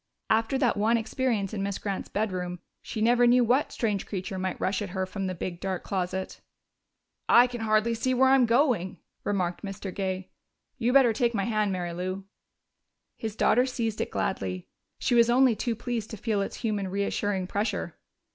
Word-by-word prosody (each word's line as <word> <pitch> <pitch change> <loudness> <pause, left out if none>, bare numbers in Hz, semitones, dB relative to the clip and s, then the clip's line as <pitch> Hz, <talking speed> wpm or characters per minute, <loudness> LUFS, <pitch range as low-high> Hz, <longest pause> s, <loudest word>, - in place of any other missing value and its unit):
After 225 +4 +2
that 250 -6 +2
one 220 +3 +3
experience 225 -3 -1
in 205 - -2
Miss 200 -1 -2
Grant's 200 -2 -4
bedroom, 185 -4 -2 0.2
she 215 - -5
never 240 +2 +4
knew 245 +1 +5
what 250 +5 +2
strange 210 -4 -1
creature 190 -1 -4
might 185 0 -3
rush 190 +1 0
at 205 - -4
her 190 - +1
from 195 0 -4
the 185 - -3
big, 175 0 -5
dark 190 -1 -3
closet. 190 -1 -3 0.9
"I 240 - +8
can 245 -2 -5
hardly 215 +1 +2
see 255 +3 0
where 260 +1 +5
I'm 265 -2 +5
going," 230 - +2 0.3
remarked 180 -4 -1
Mr. 195 -1 -6
Gay. 190 -1 -3 0.5
"You 240 0 +2
better 255 -4 +6
take 235 +1 +1
my 200 - +1
hand, 215 -1 0
Mary 175 -2 -3
Lou." 185 +2 -4 0.9
His 220 -2 -5
daughter 250 +3 +3
seized 230 -4 -2
it - - -2
gladly; 95 -1 -2 0.3
she - - 0
was 235 0 +5
only 250 -1 +5
too 235 +1 -2
pleased 235 -2 -4
to 220 - -7
feel 210 -1 0
its 195 - -3
human, 210 -4 -1
reassuring 200 0 -1
pressure. 200 -3 -2
210 Hz, 185 wpm, -27 LUFS, 190-235 Hz, 0.9 s, I